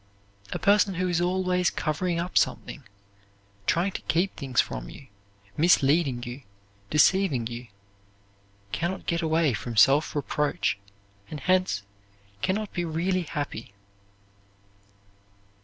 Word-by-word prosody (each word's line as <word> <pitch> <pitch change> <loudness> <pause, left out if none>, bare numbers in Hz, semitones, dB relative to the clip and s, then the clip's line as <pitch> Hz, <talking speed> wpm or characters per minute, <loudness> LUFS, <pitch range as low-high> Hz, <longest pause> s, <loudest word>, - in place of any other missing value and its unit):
A - - -1
person 200 -1 +3
who 185 +1 0
is 175 -1 +1
always 180 0 +1
covering 170 +3 -1
up 175 +1 -4
something, 145 - 0 0.8
trying 180 +4 +2
to - - -6
keep 180 +4 0
things 135 -4 -2
from - - -1
you, 135 - -13 0.5
misleading 145 -5 +3
you, 125 +2 -7 0.5
deceiving 150 -4 +3
you, 120 +1 -6 1.0
can 170 - -1
not 190 - -6
get 170 -1 0
away 160 -3 +2
from 115 +1 -5
self 140 +10 +5
reproach, 145 -6 0 0.5
and 150 - -6
hence 185 - +1 0.6
can 190 - +1
not 215 -1 -4
be 175 - -1
really 175 +3 0
happy. 145 - -5
165 Hz, 125 wpm, -26 LUFS, 135-180 Hz, 1.0 s, self